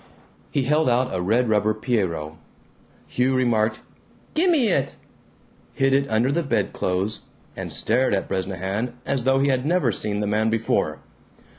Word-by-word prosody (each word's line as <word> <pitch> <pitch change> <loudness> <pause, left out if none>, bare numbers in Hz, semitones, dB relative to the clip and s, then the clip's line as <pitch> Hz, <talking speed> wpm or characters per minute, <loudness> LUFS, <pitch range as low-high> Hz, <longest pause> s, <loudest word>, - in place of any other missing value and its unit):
He 140 - 0
held 150 +1 +2
out 125 0 +1
a 90 - -1
red 115 +7 +2
rubber 105 0 +2
Pierrot. 95 -10 -1 0.7
Hugh 130 +1 0
remarked, 115 -3 +1 0.5
"Gimme 320 -7 +3
it," 140 -7 0 0.8
hid 135 0 +2
it 140 +1 +2
under 115 +4 +2
the 170 +4 +1
bedclothes, 100 - -1 0.3
and - - -6
stared 120 0 +1
at 95 - -2
Bresnahan 95 +5 -3
as 135 -3 -1
though 135 0 +3
he 140 +1 +2
had 130 -2 +1
never 160 -5 +2
seen 105 +1 -2
the 105 - -1
man 110 +2 +1
before. 115 0 0
120 Hz, 150 wpm, -23 LUFS, 105-135 Hz, 0.8 s, Gimme